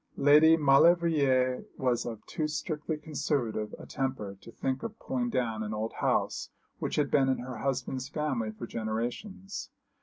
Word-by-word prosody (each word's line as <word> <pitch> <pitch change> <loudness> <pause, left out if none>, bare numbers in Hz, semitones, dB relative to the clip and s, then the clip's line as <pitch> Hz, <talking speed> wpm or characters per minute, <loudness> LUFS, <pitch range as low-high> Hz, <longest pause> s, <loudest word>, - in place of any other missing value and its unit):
Lady 150 +3 +7
Maulevrier 140 -4 +4
was 125 -3 0
of 115 -3 -7
too 155 - -2
strictly 155 0 -3
conservative 140 -8 -2
a - - -10
temper 130 -8 -3
to - - -12
think 130 +2 -2
of 225 -1 -6
pulling 250 -2 -2
down 115 - -1
an 110 0 -3
old 110 +1 -3
house - - 0 0.3
which - - -2
had 145 -2 +1
been 135 -2 +4
in 130 - +2
her 125 -1 -6
husband's 130 0 -2
family 145 -7 -1
for 110 +2 -7
generations. 120 - -4
135 Hz, 155 wpm, -30 LUFS, 120-155 Hz, 0.3 s, Lady